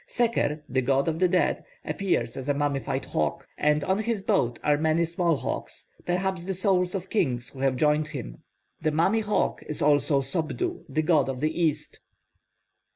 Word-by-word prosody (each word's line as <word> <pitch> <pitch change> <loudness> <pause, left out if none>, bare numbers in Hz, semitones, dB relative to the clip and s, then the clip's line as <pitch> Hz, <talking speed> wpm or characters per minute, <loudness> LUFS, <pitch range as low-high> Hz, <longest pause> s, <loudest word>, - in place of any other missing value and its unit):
Seker, 225 - 0
the 130 +1 0
god 135 +3 +1
of 165 0 -1
the 185 - +4
dead, 180 +1 +1 0.2
appears 120 -12 -1
as 135 +1 -5
a 145 - +2
mummified 140 -2 -1
hawk, - - -2
and 150 0 +2
on 190 +2 +1
his 220 -2 -1
boat 120 -8 +1
are 150 - +4
many 160 +2 +2
small 170 0 +1
hawks, - - -5 0.2
perhaps 180 0 -1
the 190 +1 -3
souls 185 -1 +1
of 190 -1 -5
kings 125 - 0
who 135 - -13
have 135 -1 +2
joined 150 +3 +2
him. 140 -7 -7 0.4
The 155 - +2
mummy 170 +8 +2
hawk 210 -1 0
is 150 - -3
also 145 -1 +3
Sopdu, 180 - -2
the 155 - 0
god 150 -5 +3
of 130 -1 -3
the 155 +3 +1
east. 155 -3 -1
155 Hz, 180 wpm, -26 LUFS, 140-185 Hz, 0.4 s, the